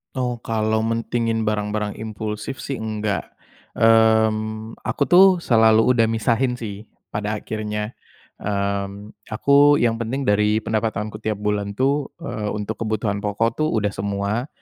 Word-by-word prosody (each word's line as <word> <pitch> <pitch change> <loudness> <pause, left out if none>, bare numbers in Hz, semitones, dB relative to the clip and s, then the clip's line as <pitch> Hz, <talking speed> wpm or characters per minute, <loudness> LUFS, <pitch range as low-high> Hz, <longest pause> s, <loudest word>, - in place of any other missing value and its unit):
Oh, 125 -2 -2
kalau 110 -1 0
mentingin 115 0 -1
barang-barang 105 0 -2
impulsif 110 +3 -5
sih 135 -3 -4
enggak, 105 -2 -3 0.4
mmm, 110 -1 +2
aku 145 - -1
tuh 180 +6 +7 0.2
selalu 110 -1 +5
udah 115 -3 +3
misahin 115 +3 +1
sih 105 -2 -7 0.2
pada 105 +1 -2
akhirnya, 105 0 -4 0.5
mmm, 100 0 -3 0.2
aku 140 +6 +5
yang 115 -4 +1
penting 130 +4 -2
dari 105 0 +2
pendapatanku 110 -1 -2
tiap 110 -1 -2
bulan 100 -1 -1
tuh, 140 +4 +1 0.2
eee, 105 -9 -4
untuk 105 +1 -4
kebutuhan 105 -1 -1
pokok 105 +5 -1
tuh 155 - +2
udah 105 -7 0
semua, 100 +5 -2
110 Hz, 130 wpm, -22 LUFS, 105-115 Hz, 0.5 s, tuh